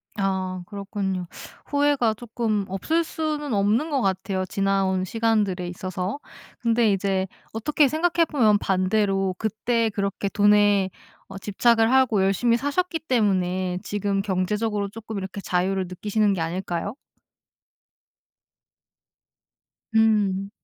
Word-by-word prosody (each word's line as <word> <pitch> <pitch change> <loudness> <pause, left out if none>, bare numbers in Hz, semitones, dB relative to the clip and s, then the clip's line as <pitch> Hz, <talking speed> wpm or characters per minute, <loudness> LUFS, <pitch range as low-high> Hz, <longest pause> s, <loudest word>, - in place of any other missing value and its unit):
아. 190 -2 -2
그렇군요. 195 -3 -4 0.4
후회가 285 -5 +2
쪼끔 220 -3 -2
없을 315 - 0
수는 305 -4 -3
없는 210 +9 +2
것 280 -4 0
같아요. 190 -1 -1
지나온 195 -1 0
시간들에 210 -4 0
있어서. 185 +5 -4 0.4
근데 230 -2 +2
이제 195 -1 0 0.3
어떻게 285 +6 +2
생각해 335 +3 +2
보면 225 -10 +3
반대로 195 0 +1
그때 225 +1 0
그렇게 200 -1 -2
돈에 205 -1 +4 0.4
어 - - -9
집착을 225 +3 +2
하고 255 -7 +4
열심히 230 +5 +2
사셨기 325 +6 -1
때문에 185 - 0
지금 205 -1 -1
경제적으로 205 +2 -1
조금 220 +1 -7
이렇게 195 +1 -6
자유를 190 +1 0
느끼시는 205 +3 0
게 180 - -2
아닐까요? 175 +4 -3 3.0
음. 205 -3 +2
205 Hz, 265 characters per minute, -24 LUFS, 190-230 Hz, 3.0 s, 돈에